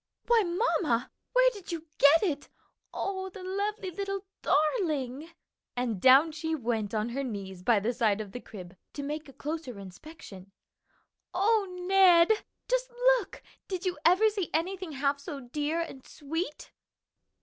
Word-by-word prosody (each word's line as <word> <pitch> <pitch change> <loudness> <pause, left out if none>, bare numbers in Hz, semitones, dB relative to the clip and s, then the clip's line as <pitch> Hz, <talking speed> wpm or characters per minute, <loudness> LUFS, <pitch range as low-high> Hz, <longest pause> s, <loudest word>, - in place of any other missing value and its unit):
"Why, 470 -1 +5
mamma, 345 - 0 0.2
where - - +5
did 405 -7 -9
you 330 -1 -5
get 290 +5 +7
it? 295 -7 -2 0.4
Oh, 380 -1 -3
the 380 0 -10
little 395 0 -3
lovely 390 0 -6 0.2
darling!" 305 - 0 0.5
and 240 -6 -2
down 270 +5 +7
she 320 +1 -2
went 225 -6 -2
on 215 +2 0
her 270 +4 -3
knees 195 -7 -6
by 220 +2 +3
the 225 +5 -1
side 220 -3 +1
of 210 -2 -6
the 245 - -6
crib, 185 -7 -11 0.2
to 285 - -5
make 300 +1 -5
a - - -13
closer 300 -6 -5
inspection. 195 - -11 0.8
"O 410 +2 +3 0.2
Ned, 375 -1 +6 0.3
just - - 0 0.3
look! 400 -4 -10 0.2
did 375 -1 -4
you 365 -1 0
ever 375 +6 +5
see 395 -5 -3
anything 360 0 -2
half 280 +1 0
so 285 0 -6
dear 295 +5 -2
and 280 -6 -5
sweet?" 310 +2 -5
310 Hz, 150 wpm, -29 LUFS, 245-380 Hz, 0.8 s, get